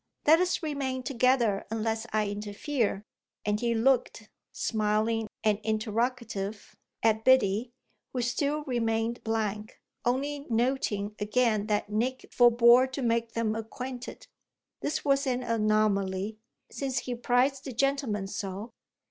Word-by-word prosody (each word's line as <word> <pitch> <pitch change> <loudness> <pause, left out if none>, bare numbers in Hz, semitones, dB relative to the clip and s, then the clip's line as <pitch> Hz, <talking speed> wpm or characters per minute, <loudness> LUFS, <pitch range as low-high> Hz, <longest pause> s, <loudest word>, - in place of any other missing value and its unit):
Let 320 +2 +7
us 360 -1 0
remain 270 -4 -2
together 250 -5 +2
unless 220 0 -2
I 215 -1 +1
interfere" 210 +2 -2 0.4
and 210 0 +1
he 235 0 0
looked, 230 -2 +1 0.2
smiling 220 +1 0 0.2
and 210 -2 +2
interrogative, 220 -1 -2 0.3
at 220 0 +3
Biddy, 235 -2 +3 0.4
who 250 -2 -2
still 285 +5 0
remained 230 -3 -1
blank, 215 -1 -2 0.2
only 280 +4 -1
noting 225 -4 0
again 215 0 +1
that 210 -1 -1
Nick 245 +5 -1
forbore 240 +1 +6
to 275 - -3
make 230 -1 0
them 230 -2 0
acquainted. 245 +3 -6 0.5
This 300 - -2
was 275 0 +2
an 250 -1 0
anomaly, 215 -2 +1 0.3
since 265 -2 -3
he 250 - -4
prized 250 +3 +1
the 270 - -4
gentleman 260 -5 0
so. 200 +2 -5
230 Hz, 120 wpm, -28 LUFS, 215-255 Hz, 0.5 s, Let